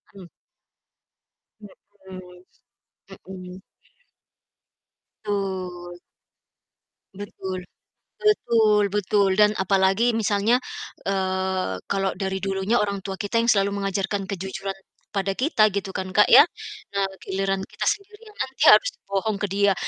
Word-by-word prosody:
mhm. 190 -3 -11 1.3
Mhm, 190 -3 -14 0.8
mhm. 185 0 -9 1.6
Betul. 185 -4 -4 1.2
Betul, 190 -2 -6 0.6
betul 225 - +3
betul, 205 0 +2
dan 210 +2 +5
apalagi 195 +5 +2
misalnya, 220 +3 +2 0.5
eee, 190 - -1
kalau 195 -1 0
dari 190 +1 -3
dulunya 195 +4 0
orang 200 -1 -1
tua 190 0 -6
kita 225 +3 0
yang 235 - +1
selalu 200 -1 +2
mengajarkan 195 0 -2
kejujuran 195 0 -5 0.4
pada 195 0 0
kita 225 -3 +2
gitu 200 -1 -3
kan 185 -1 -4
Kak 210 +2 +5
ya. 275 +4 +10 0.5
Nah, 200 -1 +1 0.2
giliran 195 0 -2
kita - - -5
sendiri 415 0 -2
yang 420 - -18
nanti 265 -4 -5
harus - - +7 0.2
bohong 200 +2 -1
ke 205 - 0
dia, 200 +1 +3
195 Hz, 110 wpm, -24 LUFS, 190-210 Hz, 1.6 s, ya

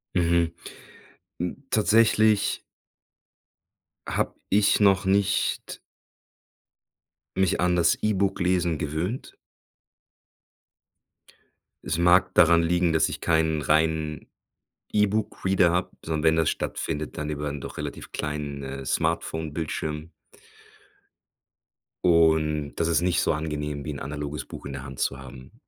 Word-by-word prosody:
Mhm. 85 -1 +2 0.9
Hm, 90 0 -2
tatsächlich 110 -1 +3 1.5
habe - - -1
ich 100 0 +3
noch 100 -2 +4
nicht 100 0 0 1.6
mich 95 -2 +2
an 90 0 +2
das 85 - +3
E-Book-Lesen 95 -4 +1
gewöhnt. 80 - -4 2.5
Es 80 - -2
mag 90 +2 +4
daran 85 -1 +5
liegen, 85 0 +2
dass 80 - +3
ich - - -6
keinen 80 -2 +1
reinen 80 +1 0 0.6
E-Book-Reader 100 -3 +2
habe, 90 +1 -1
sondern 80 -1 -2
wenn 80 0 +4
das 80 -2 +2
stattfindet, 75 -1 -4
dann 75 0 -3
über 75 0 -3
‘n 70 -1 -6
doch - - -8
relativ - - -6
kleinen, 75 -2 -4
äh, 65 0 -6
Smartphone-Bildschirm. 80 +2 -2 1.9
Und, 80 -3 +3
das 80 - 0
ist 85 0 +2
nicht 90 0 +1
so - - +2
angenehm, 75 -2 -4
wie 75 - -6
‘n 70 -2 -5
analoges 75 0 -5
Buch - - -9
in 70 - -6
der 65 -1 -6
Hand 65 -1 -9
zu 70 - 0
haben. 65 -1 -12
80 Hz, 115 wpm, -25 LUFS, 75-90 Hz, 2.5 s, daran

